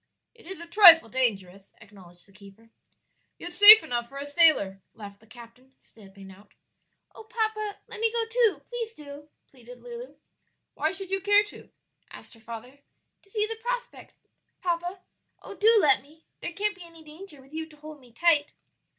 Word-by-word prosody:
"It 455 -6 -18
is 380 -1 +1
a 340 - -9
trifle 340 - +7
dangerous," 200 -6 -3
acknowledged 190 -5 -17
the - - -23
keeper. 200 +3 -19 0.7
"Yet 345 +1 -5
safe 415 +4 +10
enough 240 -1 -4
for 275 - -12
a 280 - -6
sailor," 285 - +2
laughed 200 -2 -12
the 220 - -24
captain, 240 +3 -17
stepping 195 -2 -17
out. 200 +2 -20 0.6
"Oh, 445 - -14
papa, 435 -2 -4
let - - -10
me 450 0 +1
go 465 -1 -1
too, 455 -2 0
please 465 -2 -6
do!" 290 0 -13 0.2
pleaded 245 -1 -16
Lulu. 485 0 -10 0.6
"Why - - -2
should 385 0 -8
you 390 0 -2
care 410 +1 +3
to?" 415 - -14 0.4
asked - - -14
her 230 - -18
father. 235 +4 -11 0.4
"To 395 - -29
see 425 +1 -1
the 450 +1 -7
prospect, - - -7 0.5
papa; 350 +1 -4 0.4
oh, - - -10
do 440 +3 +3
let 290 -7 +2
me! 310 +4 -24
there - - -5
can't 415 +3 -2
be 370 -2 -14
any 330 -1 -14
danger 310 0 -13
with 270 +2 -21
you 320 0 -6
to 305 - -19
hold 305 0 -13
me 250 -3 -21
tight." 295 +3 +1
310 Hz, 180 wpm, -25 LUFS, -, 0.7 s, safe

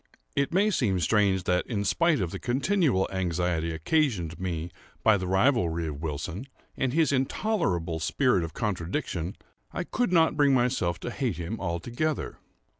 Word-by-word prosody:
It 140 - +1
may 200 +5 +3
seem 105 - +1
strange 95 +1 +2
that 90 0 0
in 100 -4 -2
spite 165 - +2
of 85 -3 -2
the - - -5
continual 135 - +1
anxiety 90 -3 -1
occasioned 85 - 0
me 85 -2 -3 0.3
by 110 - +6
the 95 -2 -2
rivalry 95 -5 +2
of 75 -1 -7
Wilson, 80 - -4 0.3
and 130 -2 0
his 160 +2 +2
intolerable 130 - 0
spirit 110 - +2
of 80 - -6
contradiction, 95 - -2 0.4
I - - -3
could 245 +3 -1
not 165 -3 +4
bring 145 -2 +4
myself 120 -9 +1
to 120 - -4
hate 120 - -2
him 90 +6 -4
altogether. 120 - -2
100 Hz, 155 wpm, -27 LUFS, 85-140 Hz, 0.4 s, by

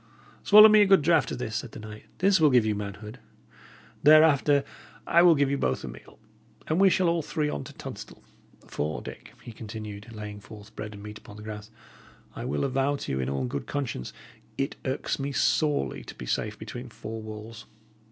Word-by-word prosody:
"Swallow 210 +1 +9
me 215 -1 +6
a 205 - +5
good 195 -6 +5
draught 160 -4 +3
of - - -3
this," 110 -3 -3
said 120 0 -6
the - - -8
knight. 110 0 -10
"This 190 -2 +3
will 155 - +6
give 125 -4 +4
you 110 - +1
manhood. 105 +3 -7 0.8
Thereafter, 150 -2 +5 0.4
I 170 - +4
will 175 -2 +7
give 140 -1 +1
you 140 - -1
both 65 - -1
a - - -5
meal, - - -12 0.5
and 160 +4 0
we 195 - +7
shall 185 -1 +2
all 170 0 +1
three 150 0 -2
on 70 - -4
to - - -11
Tunstall. - - -10 0.4
For, 75 +1 -4
Dick," - - -10
he - - -9
continued, 110 -1 -8
laying 105 -2 -8
forth 105 0 -14
bread 105 0 -7
and 100 - -11
meat 105 +1 -9
upon 105 - -13
the 105 - -10
grass, 105 0 -8 0.7
"I - - -6
will 75 - -1
avow 135 +1 0
to - - -5
you, 65 - -1
in 65 0 -2
all 70 -1 -2
good 65 +1 -5
conscience, 130 - -4 0.5
it 135 - -2
irks 130 +1 -2
me 140 +1 -3
sorely 145 - 0
to - - -10
be 60 - -8
safe 105 - -2
between 120 +3 -8
four 110 -1 -7
walls. 110 +1 -9
115 Hz, 205 wpm, -27 LUFS, 105-145 Hz, 0.8 s, Swallow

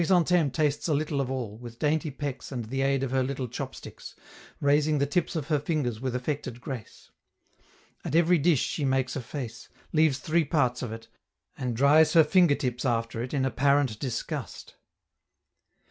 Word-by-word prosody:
Chrysantheme 175 -3 +3
tastes 150 +2 0
a 155 - +2
little 145 -1 -1
of 130 - -3
all, 120 -5 -4
with 120 -1 -10
dainty 155 +3 0
pecks 140 -1 -5
and 120 -4 -4
the 135 +5 -3
aid 135 0 +1
of 130 - -2
her 130 0 +2
little 130 0 -2
chopsticks, 130 +3 -8 0.4
raising 150 +1 +3
the 140 - +2
tips 165 +5 -1
of 155 -1 -3
her 150 -2 +2
fingers 140 -7 -2
with 130 -2 -2
affected 130 -1 -3
grace. 125 -3 -8 0.9
At - - -3
every 170 +1 +4
dish 150 -3 +3
she 150 - -2
makes 130 -1 0
a 135 - -2
face, 120 -2 -7 0.2
leaves 155 -4 +3
three 160 +4 +1
parts 130 -5 +1
of 125 -4 -4
it, 115 0 -8 0.5
and 125 -3 -3
dries 145 +5 +5
her 165 -2 +8
finger 170 -1 +4
tips 125 -4 -3
after 115 -2 -1
it 125 - -5
in 135 -3 0
apparent 135 -2 +2
disgust. 125 -4 -5
140 Hz, 175 wpm, -27 LUFS, 125-150 Hz, 0.9 s, her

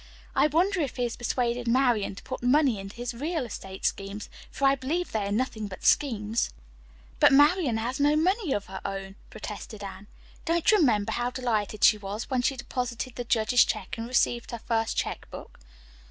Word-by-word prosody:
I - - +5
wonder 360 +6 +2
if 280 - -2
he 250 - -1
has 240 -1 -2
persuaded 240 0 -1
Marian 235 -5 +2
to - - -11
put 260 - -6
money 255 -3 +3
into 195 +1 -8
his 245 +1 -4
real 300 +3 -2
estate 190 -4 -7
schemes, 200 +1 -3 0.2
for 275 - -2
I 270 - +6
believe 290 +7 -2
they 210 -2 -1
are - - -3
nothing 220 -1 -1
but 185 - -9
schemes." 225 -5 +2 0.7
"But - - +7
Marian 290 -2 +4
has 245 +4 -3
no 290 +1 +4
money 365 - +1
of 205 -5 -1
her 190 0 -8
own," 195 -1 -5 0.2
protested 210 0 -8
Anne. 195 0 -8 0.4
"Don't 340 +6 +2
you 425 - +5
remember 215 - +2
how 240 0 -1
delighted 220 -5 -2
she 215 - +6
was 205 +5 -6
when 255 -1 +2
she 265 +2 0
deposited 250 0 -4
the 245 - -4
judge's 235 +1 +4
check 210 -4 -3
and 230 0 -5
received 240 -1 +1
her 235 - -4
first 225 -1 0
check - - -3
book?" - - -11
240 Hz, 195 wpm, -27 LUFS, 210-275 Hz, 0.7 s, But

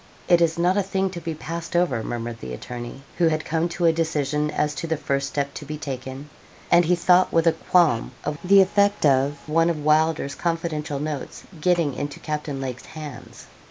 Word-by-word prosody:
'It 175 -1 +5
is 165 -1 +2
not 180 +3 +2
a - - +3
thing 190 0 -1
to 175 -2 -7
be 165 -1 -4
passed 165 +2 -6
over,' 165 -10 +2
murmured 115 0 -5
the 65 - -7
attorney, 120 - -8 0.2
who 170 - +5
had 155 -1 0
come 165 +2 0
to 170 +1 -1
a 165 - +5
decision 150 -2 0
as 150 0 0
to 165 - -5
the 160 -1 0
first 140 -1 -1
step 140 -1 -2
to - - -7
be 150 +1 -6
taken, 135 -1 -6 0.4
and 175 0 +6
he 180 +2 +3
thought 180 +1 +4
with 165 0 +2
a 165 - +6
qualm 160 -9 +2
of 150 - -2
the 195 +2 +7
effect 200 0 +2
of 140 +1 +2
one 165 +2 +3
of 150 -3 -3
Wylder's 155 -2 +2
confidential 160 -2 -2
notes 150 -2 -5 0.2
getting 170 -4 +2
into 145 +2 -5
Captain 150 -2 -4
Lake's 130 -2 -5
hands. 150 -5 -9
155 Hz, 200 wpm, -23 LUFS, 140-170 Hz, 0.4 s, the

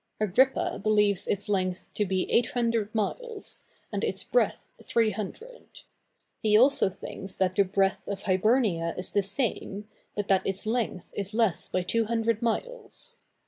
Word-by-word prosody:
Agrippa 215 +6 +2
believes 210 -2 +2
its 205 0 0
length 185 -3 -1
to 210 - 0
be 185 0 0
800 230 -3 +1
miles, 440 - -2 0.3
and - - -2
its - - -1
breadth - - +1 0.2
300; 230 - -2 0.6
he 210 -1 +4
also 260 -3 +5
thinks 190 0 -6
that 185 -1 +1
the 200 - +5
breadth 195 0 0
of 200 -1 -4
Hibernia 190 -4 +2
is 180 - -3
the 205 - +3
same, 205 -1 -1 0.3
but 205 -1 -2
that 190 -1 +4
its 195 +1 -1
length 220 -5 -2
is 200 +1 -3
less 225 -6 +2
by 185 - 0
200 225 +3 0
miles. 485 - -3
210 Hz, 140 wpm, -28 LUFS, 195-235 Hz, 0.6 s, also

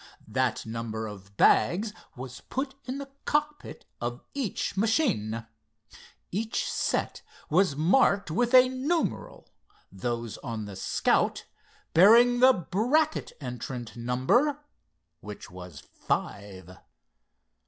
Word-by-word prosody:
That - - -1
number 110 -1 -4
of 100 -1 -11
bags 210 +5 +3 0.2
was 125 0 -8
put 265 +1 -3
in 255 +1 -4
the 280 -1 -8
cockpit 295 0 -2 0.2
of 120 +1 -4
each 260 -11 -3
machine. 190 - 0 0.9
Each 225 - -2
set - - -1 0.3
was 180 -2 +3
marked 195 - +3
with 240 +9 +2
a 255 0 +8
numeral, 280 +6 -2 0.4
those 115 +3 -4
on 115 -5 -5
the 100 -1 -8
Scout 95 - +1 0.5
bearing 235 +7 +7
the 260 +1 +8
Brackett 255 - 0
entrant 125 -3 -6
number, 180 - +1 0.5
which 105 -3 -10
was 90 -4 -10
five. 95 -3 -5
165 Hz, 105 wpm, -27 LUFS, -, 0.9 s, a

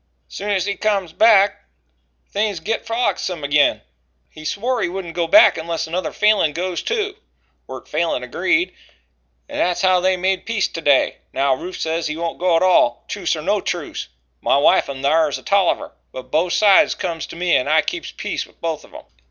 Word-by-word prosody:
Soon's 200 -2 -2
he 200 0 -2
comes 200 -6 -1
back, 205 0 +4 0.7
things 205 -3 -1
git 220 +8 -3
frolicksome 195 -8 -2
agin. 145 +1 +2 0.5
He 155 - -12
swore 235 +8 -1
he - - 0
wouldn't 180 -2 -6
go 170 -1 -1
back 210 0 +6
unless 165 0 -3
another 175 +3 -3
Falin 210 -8 +2
goes 180 +2 -3
too. 420 -3 -2 0.5
Wirt - - -9
Falin 165 -7 -1
agreed, 190 - 0 0.7
and 290 0 -6
that's 180 +2 0
how 185 -1 +4
they 185 +1 +1
made 185 0 -1
peace 225 -3 0
to 165 - -6
day. 145 -3 +3 0.2
Now 135 0 +2
Rufe 180 +8 -6
says 165 +1 -2
he 155 +1 -4
won't 170 0 -4
go 180 -1 +2
at 165 - +3
all 175 -10 +3
truce - - -2
or - - -7
no - - +1
truce. - - -4 0.3
My - - +2
wife 140 - +3
in 135 -1 -6
thar 155 +2 +3
is 140 - -3
a - - -14
Tolliver, 200 -3 +1 0.2
but 130 0 -10
both 170 +3 +1
sides 205 -2 +5
comes 170 -4 -4
to - - -10
me 175 0 +1
and 130 - +1
I 155 +1 +4
keeps 360 - -5
peace - - -4
with - - -26
both 165 -2 -3
of - - -18
'em." - - -10
180 Hz, 195 wpm, -20 LUFS, 160-200 Hz, 0.7 s, back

